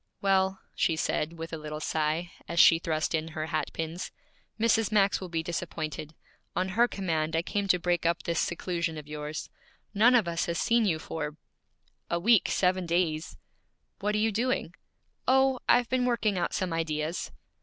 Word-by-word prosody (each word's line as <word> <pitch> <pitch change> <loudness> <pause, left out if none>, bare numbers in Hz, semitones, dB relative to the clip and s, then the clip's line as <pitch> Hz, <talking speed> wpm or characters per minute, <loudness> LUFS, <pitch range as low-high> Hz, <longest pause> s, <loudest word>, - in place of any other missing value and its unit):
'Well,' 190 -1 +2
she 165 - +1
said, 160 0 -1
with 165 0 -7
a 160 - -3
little 150 0 -6
sigh, 155 +3 -1 0.2
as 170 0 -1
she 165 - +8
thrust 155 -1 -1
in 160 0 0
her 155 - -1
hat 155 -1 -2
pins, 165 +2 -4 0.5
'Mrs. 225 -1 +3
Max 200 -2 +3
will 185 - -6
be 165 -1 -2
disappointed. 155 -3 -4 0.4
On 185 +1 0
her 230 +5 +3
command 160 -7 -1
I 165 - +1
came 200 +2 -2
to 185 - +4
break 175 -1 0
up 170 0 +1
this 170 -1 -1
seclusion 170 -2 -2
of 150 -1 -8
yours. 150 0 -5 0.4
None 230 +5 +5
of 225 -7 +3
us 170 0 -1
have 170 0 -1
seen 235 -1 +3
you 170 -6 +2
for 150 -1 -5 0.3
' - - -43
'A 170 - 0
week, 220 +3 +4
seven 185 -1 +1
days!' 165 -2 0 0.6
'What 210 +1 0
are - - +2
you 220 +1 +2
doing?' 245 +5 -1 0.5
'Oh 265 0 +4
I've 245 0 +5
been 255 0 +1
working 230 -4 +1
out 175 -2 -1
some 185 -3 -1
ideas.' 160 0 -2
170 Hz, 185 wpm, -28 LUFS, 160-200 Hz, 0.6 s, she